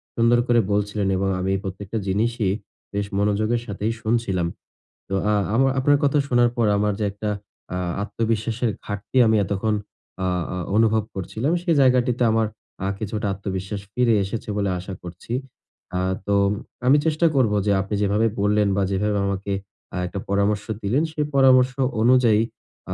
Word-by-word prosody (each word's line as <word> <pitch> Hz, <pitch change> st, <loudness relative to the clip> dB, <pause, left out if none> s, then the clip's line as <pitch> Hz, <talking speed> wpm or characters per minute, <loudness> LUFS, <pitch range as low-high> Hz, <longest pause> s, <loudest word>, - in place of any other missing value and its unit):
সুন্দর 120 Hz, +1 st, +4 dB
করে 120 Hz, -1 st, +4 dB
বলছিলেন 105 Hz, 0 st, 0 dB
এবং 95 Hz, +1 st, 0 dB
আমি 95 Hz, +1 st, -1 dB
এই -, -, -1 dB
প্রত্যেকটা 95 Hz, +2 st, -5 dB
জিনিসই 105 Hz, 0 st, +1 dB, 0.4 s
বেশ 100 Hz, 0 st, -1 dB
মনোযোগের 105 Hz, +3 st, +1 dB
সাথেই 105 Hz, +1 st, -2 dB
শুনছিলাম। 110 Hz, -6 st, 0 dB, 0.6 s
তো -, -, -4 dB, 0.2 s
আ -, -, +3 dB, 0.2 s
আমা 130 Hz, +4 st, +4 dB
আপনার 145 Hz, +2 st, +4 dB
কথা 145 Hz, +1 st, +3 dB
শোনার 120 Hz, -2 st, +4 dB
পর 115 Hz, -, +3 dB
আমার 105 Hz, 0 st, +1 dB
যে 105 Hz, -, 0 dB
একটা 105 Hz, +1 st, -4 dB, 0.5 s
আ -, -, -1 dB, 0.3 s
আত্মবিশ্বাসের 115 Hz, +2 st, -1 dB, 0.2 s
ঘাটতি 105 Hz, +5 st, -4 dB
আমি 110 Hz, -, +4 dB
এতক্ষণ 100 Hz, +3 st, 0 dB, 0.5 s
আ -, -, +1 dB, 0.3 s
আ -, -, -4 dB, 0.2 s
অনুভব 110 Hz, 0 st, +3 dB
করছিলাম, 110 Hz, -, -2 dB
সেই 170 Hz, -3 st, +2 dB
জায়গাটিতে 125 Hz, -1 st, +3 dB
আমার 110 Hz, -1 st, +2 dB, 0.4 s
আ -, -, 0 dB
কিছুটা 105 Hz, 0 st, -3 dB
আত্মবিশ্বাস 95 Hz, +1 st, -4 dB
ফিরে 125 Hz, -1 st, +3 dB
এসেছে 105 Hz, +3 st, -5 dB
বলে 100 Hz, -1 st, 0 dB
আশা 95 Hz, +2 st, -7 dB
করছি। 90 Hz, +6 st, -8 dB, 0.6 s
আ -, -, +1 dB, 0.3 s
তো 100 Hz, -, +2 dB, 0.5 s
আমি 140 Hz, -, +7 dB
চেষ্টা 160 Hz, +1 st, +3 dB
করব 120 Hz, -6 st, +3 dB
যে 105 Hz, -, +2 dB
আপনি 100 Hz, +2 st, -3 dB
যেভাবে 105 Hz, +3 st, +2 dB
বললেন 105 Hz, 0 st, +3 dB
বা 100 Hz, -, +2 dB
যেভাবে 105 Hz, +2 st, 0 dB
আমাকে 100 Hz, 0 st, -3 dB, 0.4 s
আ -, -, -3 dB
একটা 95 Hz, +3 st, -5 dB
পরামর্শ 100 Hz, +1 st, +1 dB, 0.2 s
দিলেন 120 Hz, +10 st, +2 dB
সেই 150 Hz, -1 st, -1 dB
পরামর্শ 130 Hz, -1 st, +6 dB, 0.3 s
অনুযায়ী 120 Hz, -2 st, +5 dB, 0.5 s
আ -, -, 0 dB
105 Hz, 160 wpm, -23 LUFS, 100-120 Hz, 0.6 s, আমি